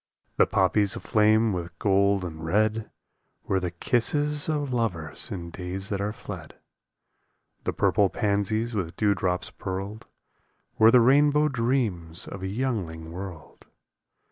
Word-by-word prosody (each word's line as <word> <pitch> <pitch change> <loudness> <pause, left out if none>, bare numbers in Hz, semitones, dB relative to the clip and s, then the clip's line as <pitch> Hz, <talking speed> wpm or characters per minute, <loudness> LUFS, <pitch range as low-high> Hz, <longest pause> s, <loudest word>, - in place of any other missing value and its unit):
The - - +5
poppies 100 +1 +2
aflame 110 0 +3
with 85 -1 -5
gold 100 -1 +2
and 80 -2 -7
red 110 +5 +1 0.5
Were 95 - 0
the 90 -1 -2
kisses 145 - 0
of 145 -4 -1
lovers 90 -11 -2
in 85 -6 -6
days 90 +3 -5
that 100 -1 -2
are 105 +1 -1
fled. 105 - -9 1.1
The - - -1
purple 100 -2 +3
pansies 110 +3 0
with 90 -6 -3
dew 105 -2 +3
drops 90 -2 -1
pearled 100 +4 -6 0.7
Were 110 0 +8
the 125 +1 +6
rainbow 145 +4 +4
dreams 115 - -1
of 95 - -7
a 95 - -3
youngling 95 -8 -3
world. 90 -3 -9
100 Hz, 135 wpm, -26 LUFS, 90-115 Hz, 1.1 s, Were